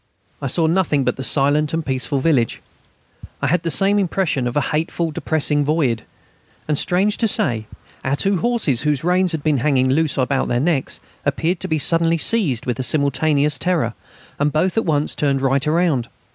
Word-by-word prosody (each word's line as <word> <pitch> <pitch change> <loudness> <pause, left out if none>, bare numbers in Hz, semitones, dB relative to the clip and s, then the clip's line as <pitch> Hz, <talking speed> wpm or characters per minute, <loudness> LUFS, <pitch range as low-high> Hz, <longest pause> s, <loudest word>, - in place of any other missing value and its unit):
I 140 - -2
saw 160 +5 +2
nothing 160 -4 +1
but - - -1
the 130 - -6
silent 145 +3 +2
and 165 -1 -3
peaceful 135 +1 -1
village; 130 -5 +1 0.8
I - - -2
had 160 +5 +1
the 165 - -3
same 200 +4 +2
impression 175 -9 -1
of 120 - -3
a - - +3
hateful 165 +2 -1
and 160 - -5
depressing 150 -1 +1
void. 140 -7 0 0.6
And, 150 -2 0
strange 195 +4 +1
to 230 - +2
say, 115 - +1 0.4
our 135 +1 0
two 195 +5 0
horses, 215 - +1
whose 150 -2 -1
reins 180 +1 +2
had 160 -3 -4
been 155 -2 +1
hanging 130 -1 +1
loose 155 +2 +1
on 130 -2 +1 0.2
their 120 - 0
necks, 145 -1 -1 0.2
appeared 170 +2 -1
to - - -5
be 160 - 0
suddenly 165 +2 +2
seized 160 - +2
with 125 0 -3
a - - -1
simultaneous 145 +1 +1
terror, 165 -11 0 0.5
and 145 +1 +1
both 170 +5 0
at 225 - 0
once 150 -3 0
turned 140 -2 0
right 135 +2 0
round. 155 -7 +1
150 Hz, 190 wpm, -19 LUFS, 135-170 Hz, 0.8 s, a